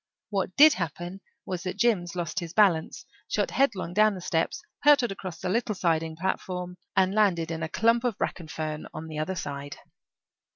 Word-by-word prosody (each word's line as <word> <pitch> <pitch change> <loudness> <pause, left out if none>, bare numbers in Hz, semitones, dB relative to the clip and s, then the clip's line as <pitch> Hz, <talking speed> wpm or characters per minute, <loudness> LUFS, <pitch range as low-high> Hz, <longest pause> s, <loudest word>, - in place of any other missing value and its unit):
What 195 -2 -1
did 305 +1 +8
happen 175 - -5 0.2
was 180 -2 -4
that 185 +1 -4
Jims 195 -7 +1
lost 175 +3 -2
his 170 -2 -7
balance, 180 -7 +2 0.2
shot - - 0
headlong 200 -10 +1
down 215 0 +4
the - - -6
steps, 175 - -1 0.2
hurtled 280 -6 +5
across 190 -3 -6
the - - -4
little 215 +2 0
siding 165 -3 0
platform, 180 0 -3 0.2
and 190 0 +3
landed 180 -6 +2
in 165 0 -4
a 160 - -2
clump 230 +5 +2
of 240 -5 -1
bracken 170 -3 -3
fern 155 -1 -4
on 155 - -5
the 155 -1 -5
other 185 +5 -2
side. 140 -3 -5
180 Hz, 180 wpm, -27 LUFS, 165-210 Hz, 0.2 s, did